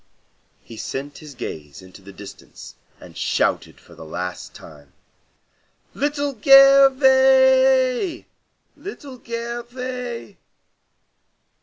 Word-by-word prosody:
He 115 - -13
sent 140 +5 -7
his 150 -3 -13
gaze 75 - -9
into 95 +1 -16
the 100 +1 -14
distance 100 +1 -13 0.3
and - - -15
shouted - - -2
for - - -19
the - - -13
last 90 +3 -7
time, 70 -3 -16 1.0
"Little 285 -1 -3
Gervais! 265 +1 +4 0.5
Little 280 -10 -11
Gervais! 240 - -7
250 Hz, 90 wpm, -20 LUFS, -, 1.0 s, Gervais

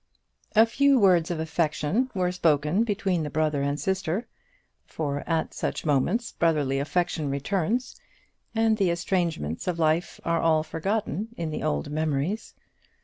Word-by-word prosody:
A 220 +1 +8
few 280 +4 +3
words 180 -5 +4
of 170 -2 -2
affection 160 - 0
were 180 -1 +1
spoken 160 +2 +2
between 200 -5 0
the 150 - -3
brother 155 -1 0
and 140 +1 -1
sister, 190 +2 -1 0.6
for 145 -2 -3
at 165 -1 0
such - - -3
moments 165 - +1
brotherly 150 -5 +1
affection 160 0 -1
returns, 195 - -1 0.5
and 225 -1 +3
the 195 -4 +2
estrangements 170 - -1
of 180 -2 0
life 160 +1 +1
are 170 0 +1
all 160 -1 +3
forgotten 200 +6 -2
in 165 -2 -3
the - - -4
old 75 - -1
memories. 155 +7 -2
165 Hz, 145 wpm, -26 LUFS, 150-195 Hz, 0.6 s, A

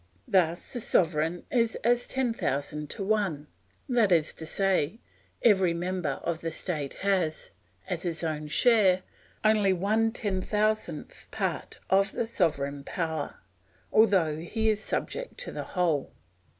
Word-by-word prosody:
Thus 175 -2 +1
the 245 - -3
sovereign 165 -2 +1
is 230 -2 +2
as 240 +1 +2
ten 260 -3 0
thousand 150 - -2
to 200 - -3
one; 195 -8 0 0.4
that 235 -6 +3
is 160 -3 +3
to 160 - -7
say, 195 +1 +1 0.4
every 190 -6 +4
member 180 -1 -1
of 170 -1 -2
the 165 - -3
state 155 -5 -3
has, 180 -6 0 0.4
as 175 - -2
his 170 -2 -2
own 155 -2 -2
share, 190 0 +4 0.4
only 215 -3 +4
one 215 +5 +1
ten 205 -5 -2
thousandth 210 -6 -1
part - - -3
of 195 +1 +3
the 235 - -1
sovereign 145 -10 -1
power, 160 -2 -3 0.5
although 190 -8 +4
he 220 +7 -1
is 215 0 -2
subject - - -3
to - - -4
the - - -4
whole. 165 -6 +1
185 Hz, 140 wpm, -28 LUFS, 160-215 Hz, 0.5 s, every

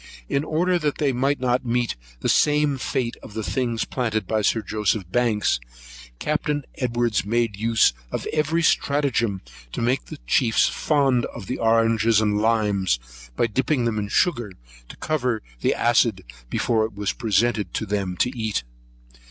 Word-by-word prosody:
In 140 - 0
order 175 +3 +1
that 150 -3 -1
they 145 -2 +1
might 135 +3 +1
not 125 0 +1
meet 120 -1 0 0.3
the - - -1
same 150 -2 +3
fate 125 -1 -2
of 105 - -12
the 110 - -3
things 120 -1 -1
planted 110 -5 -2
by 110 +3 0
Sir 110 +1 +1
Joseph 105 -1 0
Banks, 115 - +1 0.6
Captain 150 - -1
Edwards 120 -4 0
made 115 0 0
use 110 - +3 0.2
of - - -3
every 155 +2 +1
stratagem 130 - +1 0.3
to - - -5
make 125 +3 0
the - - -9
chiefs 115 - +3
fond 135 -5 +1
of - - -9
the 125 - -4
oranges 115 -1 +3
and 105 -1 +1
limes, 105 - +1 0.4
by - - +2
dipping 125 +3 0
them 110 -2 0
in 100 - -3
sugar, 120 - +1 0.4
to - - -11
cover 125 -8 -1 0.2
the - - +1
acid 115 -5 +2 0.3
before 115 - +1
it 110 -2 -8
be 105 0 -5
presented 110 0 +1
to 110 - -1
them 95 -3 -2
to 125 - 0
eat. 110 - -2
115 Hz, 160 wpm, -23 LUFS, 110-130 Hz, 0.6 s, same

